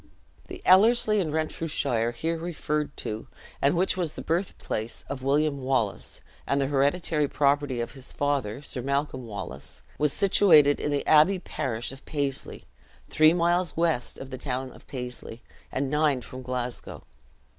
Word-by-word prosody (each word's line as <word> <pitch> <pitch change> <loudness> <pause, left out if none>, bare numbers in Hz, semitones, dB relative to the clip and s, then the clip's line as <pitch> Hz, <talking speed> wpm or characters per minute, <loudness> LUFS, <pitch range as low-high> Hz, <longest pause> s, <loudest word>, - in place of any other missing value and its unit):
" - - -30
The - - -9
Ellerslie 215 +3 +5
in 165 -6 -1
Renfrewshire 150 -6 -1
here 160 +8 -2
referred 155 -3 -3
to, 110 +1 -5 0.3
and 145 +5 +3
which 185 +2 +2
was 175 -5 -2
the - - -6
birthplace 160 - -3
of 140 -2 -5
William 140 +1 +1
Wallace, 105 - -1 0.3
and 140 - +1
the 135 - +2
hereditary 145 +2 +1
property 140 -3 +1
of 120 - -4
his 135 -2 -10
father, 140 -4 -1
Sir 130 - -5
Malcolm 140 -1 -2
Wallace, 95 - -7 0.2
was 150 -1 +2
situated 155 -4 +5
in - - -1
the 145 -1 -1
abbey 160 +5 +5
parish 120 -9 -3
of 135 +1 -12
Paisley, 140 -3 -3 0.5
three 155 +1 +6
miles 175 0 +1
west 165 -7 0
of 135 0 -9
the 130 0 -7
won 130 -1 -3
of - - -17
Paisley, 125 -3 -7 0.3
and 135 0 -2
nine 150 -3 +2
from 130 +2 -9
Glasgow. 125 -1 -5
140 Hz, 155 wpm, -27 LUFS, 130-160 Hz, 0.5 s, three